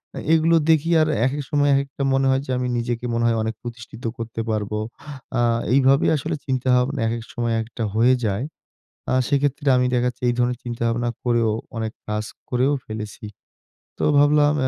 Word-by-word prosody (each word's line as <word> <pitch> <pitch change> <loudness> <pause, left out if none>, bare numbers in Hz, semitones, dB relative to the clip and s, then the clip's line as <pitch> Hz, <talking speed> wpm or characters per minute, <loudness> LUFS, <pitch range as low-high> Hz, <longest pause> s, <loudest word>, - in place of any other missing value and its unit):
আ - - -6 0.2
এগুলো 165 +1 +4 0.2
দেখি 160 +1 +2
আর 155 - +3 0.2
একেক 140 +3 -1
সময় 145 -1 +3
একেকটা 140 0 -2
মনে 135 0 +2
হয় 130 - +1
যে, - - -16
আমি 125 0 -1
নিজেকে 120 0 -2
মনে 115 - 0
হয় 115 -1 +2
অনেক 110 0 -3
প্রতিষ্ঠিত 120 -1 -9
করতে 115 0 -4
পারবো। 105 0 -2 0.6
আ - - +3 0.3
এইভাবেই 135 +1 +4
আসলে 155 +4 -3
চিন্তাভাবনা 130 +1 +1
একেক 115 0 -3
সময় 120 -1 -1
একেকটা 115 +1 -5
হয়ে 125 +3 +5
যায়। 100 +7 -1 0.7
আ - - +2
সেক্ষেত্রে 145 +1 0
আমি 125 - +2
দেখা 125 0 +2
যাচ্ছে 125 +1 -12
এই 120 - +2
ধরনের 125 0 +1
চিন্তাভাবনা 120 0 -1
করেও 120 -2 +2 0.3
অনেক 110 0 -3 0.2
কাজ 105 0 -2 0.2
করেও 130 +3 +2
ফেলেছি। 110 0 -7 0.7
তো - - -1
ভাবলাম 145 0 +4
125 Hz, 170 wpm, -22 LUFS, 115-140 Hz, 0.7 s, হয়ে